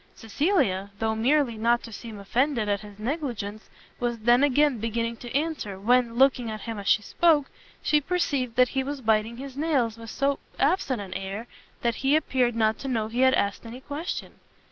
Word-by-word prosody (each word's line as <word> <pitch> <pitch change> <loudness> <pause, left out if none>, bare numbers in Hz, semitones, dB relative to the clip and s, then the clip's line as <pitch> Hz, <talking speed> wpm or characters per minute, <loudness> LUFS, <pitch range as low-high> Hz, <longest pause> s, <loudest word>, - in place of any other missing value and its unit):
Cecilia, 220 - 0
though 220 0 0
merely 245 +1 +2
not 235 +2 +2
to 230 - -9
seem 220 0 -8
offended 235 +3 0
at 205 -1 +1
his 205 -1 -12
negligence, 225 -4 -4 0.3
was 240 -1 -1
then 240 +3 +4
again 290 -2 +3
beginning 230 +1 -2
an 240 - -7
answer, 280 -9 -2
when, 240 +2 +2
looking 255 -2 +3
at 215 -1 -5
him 225 -3 -5
as 200 - -7
she 215 - +4
spoke, 310 +1 +2 0.3
she 300 -1 +3
perceived 280 -8 -1
that 250 0 +5
he 265 -1 -1
was 285 +1 -4
biting 220 -1 +1
his 270 0 -8
nails 270 -7 0
with 230 -1 -9
so 275 +3 0 0.2
absent 275 - +1
an 190 -2 -7
air, 195 +4 -5 0.4
that 235 -1 +1
he 275 +2 +3
appeared 255 -6 +1
not 220 -1 +1
to 275 - -6
know 225 -4 -1
he 235 +2 -3
had 260 0 +5
asked 200 0 -1
any 235 +2 -8
question. 295 +6 -5
240 Hz, 190 wpm, -26 LUFS, 220-275 Hz, 0.4 s, that